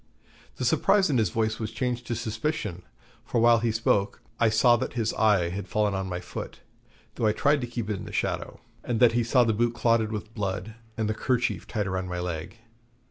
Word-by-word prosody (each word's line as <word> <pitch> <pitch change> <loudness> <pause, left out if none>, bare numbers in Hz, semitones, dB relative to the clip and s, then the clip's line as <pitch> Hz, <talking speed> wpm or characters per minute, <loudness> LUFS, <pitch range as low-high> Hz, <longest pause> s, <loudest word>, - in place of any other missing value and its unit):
The - - -3
surprise 195 -5 +3
in 130 - +2
his 110 -5 +2
voice 110 +2 -1
was 110 -2 -3
changed 125 0 -3
to 120 - -1
suspicion, 110 - -3 0.4
for 120 - -1
while 115 0 +5
he 115 0 0
spoke 105 -2 +1 0.2
I 115 - +4
saw 115 +2 +5
that 130 - -4
his 115 -2 -1
eye 105 -6 +3
had 95 +2 -5
fallen 105 +2 +1
on 95 -1 -3
my 90 -1 -3
foot, 90 - -7 0.5
though 110 - 0
I 105 - +3
tried 145 +5 +2
to 120 - -3
keep 120 -3 -4
it 105 -2 -2
in - - -8
the - - -8
shadow; - - -3 0.2
and 120 -2 -1
that 120 -2 +6
he 120 0 +1
saw 125 +2 +4
the 115 -2 +1
boot 120 +2 0
clotted 115 -2 +2
with 110 +1 -5
blood, 100 0 -3 0.2
and 110 -2 0
the 110 - 0
kerchief 125 +2 -1
tied 105 -3 -2
round 95 -1 -3
my 90 0 -3
leg. 90 +3 -5
110 Hz, 220 wpm, -27 LUFS, 100-120 Hz, 0.5 s, that